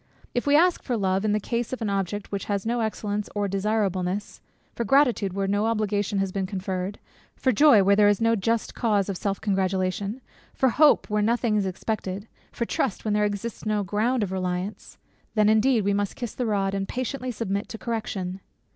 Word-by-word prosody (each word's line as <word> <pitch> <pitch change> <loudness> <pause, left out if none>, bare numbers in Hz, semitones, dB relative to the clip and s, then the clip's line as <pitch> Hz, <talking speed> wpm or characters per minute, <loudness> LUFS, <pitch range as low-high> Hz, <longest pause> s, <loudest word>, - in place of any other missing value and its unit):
If 245 +3 -1
we 285 - +5
ask 350 +3 +4
for 245 -3 -2
love, 190 -1 +1
in 215 - +1
the 210 - +2
case 235 +2 -2
of 260 - -3
an 220 -3 -2
object 195 +1 -2
which 200 -1 -3
has 200 -1 -2
no 235 +1 0
excellence 210 -2 -2
or 205 -1 0
desirableness; 195 -1 -1 0.3
for 235 - -2
gratitude, 240 -6 +3
where 195 0 -1
no 205 +2 +1
obligation 210 -2 0
has 195 -1 0
been 190 -1 -2
conferred; 190 0 -3 0.4
for 260 - +1
joy, 240 -3 +6
where 200 +1 +5
there 205 0 +5
is 205 -1 +3
no 230 0 +3
just 225 +2 -1
cause 210 -4 +1
of 195 - -2
self 200 0 -2
congratulation; 195 +2 -1 0.4
for 265 - +3
hope, 295 +5 +4
where 210 0 +2
nothing 230 0 +1
is 200 -2 +1
expected; 195 +1 -4 0.2
for 235 - -2
trust, 230 -2 -2
where 215 - 0
there 210 0 +2
exists 205 +3 -4
no 215 -1 0
ground 220 +5 0
of 190 - -3
reliance; 185 +2 -4 0.4
then 210 -1 +4
indeed, 220 +1 +3
we 200 +1 +1
must 200 0 -1
kiss 240 -3 -5
the 245 - -2
rod, 195 -2 0
and 195 0 -2
patiently 255 +1 -3
submit 205 -3 -3
to 225 - -6
correction. 200 -5 -3
205 Hz, 200 wpm, -25 LUFS, 195-230 Hz, 0.4 s, joy